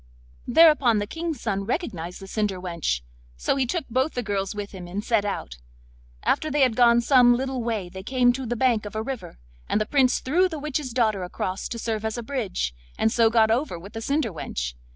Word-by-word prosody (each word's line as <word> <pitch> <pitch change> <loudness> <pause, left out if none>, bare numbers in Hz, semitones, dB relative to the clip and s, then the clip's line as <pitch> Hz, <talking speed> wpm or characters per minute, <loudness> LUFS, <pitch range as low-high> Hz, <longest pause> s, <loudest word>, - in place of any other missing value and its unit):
Thereupon 285 -5 +6
the 205 - 0
King's 325 +4 -4
son 200 -3 -2
recognised 195 - -3
the 195 - -9
cinder 200 -1 -2
wench; 170 - -2 0.4
so - - 0
he 265 -2 0
took 325 +3 -2
both 260 +6 0
the 245 - -1
girls 200 -1 -2
with 205 -1 -5
him, 185 -3 -8
and 195 +4 -4
set 220 -3 +1
out. 60 - -4 0.7
After 310 - +1
they 295 -1 +1
had 255 -4 +4
gone 235 -1 +5
some 245 -1 +5
little 265 0 -2
way 225 -5 -2
they 190 +2 -8
came 245 +3 +3
to 260 0 -5
the 240 - -1
bank 235 -4 +1
of 205 - -10
a 220 - -1
river, 255 - -6 0.3
and - - +2
the 215 - 0
Prince 260 0 +3
threw 355 +8 +2
the 320 - -5
witch's 295 -2 -3
daughter 220 -5 +1
across 185 +2 -3
to 235 - -5
serve 220 -2 -2
as 220 +1 -2
a 240 - -4
bridge, 220 - -2 0.2
and 220 - +2
so 230 -1 +4
got 220 -1 +4
over 245 - 0
with 195 +6 -11
the 225 - -5
cinder 275 - 0
wench. - - -4
230 Hz, 220 wpm, -25 LUFS, 200-260 Hz, 0.7 s, Thereupon